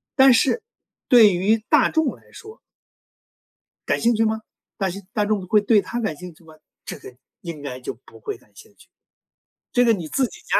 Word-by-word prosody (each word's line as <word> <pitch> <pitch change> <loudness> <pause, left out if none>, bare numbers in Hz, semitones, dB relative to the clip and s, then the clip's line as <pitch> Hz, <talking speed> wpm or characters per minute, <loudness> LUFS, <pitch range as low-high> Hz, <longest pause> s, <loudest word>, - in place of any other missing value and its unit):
但 265 -1 +7
是 270 - +2 0.5
对 225 -5 +7
于 195 +5 +2
大 300 -5 +4
众 320 -4 0
来 - - -23
说 430 +1 -12 1.3
感 - - 0
兴 235 +1 +3
趣 225 +1 +2
吗？ 220 0 -1 0.4
但 195 -2 0
是 200 +3 -8
大 210 -2 0
众 205 -3 -1
会 210 +3 +4
对 210 +1 +3
他 235 +6 -4
感 215 -9 -2
兴 180 +2 -10
趣 165 - -23
吗？ 160 -1 -16 0.3
这 - - -6
个 125 - -12 0.3
应 170 -5 -7
该 135 -3 -6
就 - - -5
不 - - -15
会 420 -3 -5
感 - - -27
兴 445 -1 -17
趣。 - - -21 0.8
这 245 -1 +3
个 230 - +4
你 175 -7 -4
自 265 - +1
己 - - -14
家 - - +1
215 Hz, 220 characters per minute, -22 LUFS, 180-245 Hz, 1.3 s, 但